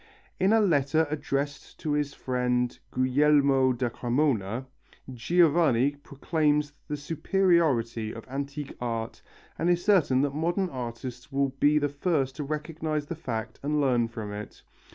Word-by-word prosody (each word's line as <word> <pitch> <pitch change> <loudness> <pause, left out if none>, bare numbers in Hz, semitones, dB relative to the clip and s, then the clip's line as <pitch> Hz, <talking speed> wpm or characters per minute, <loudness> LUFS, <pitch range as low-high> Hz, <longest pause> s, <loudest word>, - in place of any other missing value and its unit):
In 190 +2 +3
a 225 - +5
letter 160 -5 +3
addressed 145 -1 -3
to 155 - -2
his 145 -1 -1
friend 125 -1 -1
Guglielmo 135 0 +3
da 120 0 -1
Cremona, 120 -2 0 0.5
Giovanni 145 -1 +3
proclaims 150 +1 0
the 150 -1 -3
superiority 145 - +1
of 115 - -10
antique 140 +2 -5
art 115 -2 -3 0.4
and 170 - +1
is 175 0 +1
certain 155 -11 +4
that 140 -1 0
modern 175 +5 0
artists 125 -1 -7
will 140 0 +1
be 145 +3 +2
the 145 -1 +2
first 145 -2 -1
to 150 - -3
recognize 155 0 -3
the 170 - -5
fact 115 -7 -5
and 150 +1 0
learn 125 -5 +2
from 110 -3 -6
it. 105 +1 -8
140 Hz, 140 wpm, -27 LUFS, 125-155 Hz, 0.5 s, a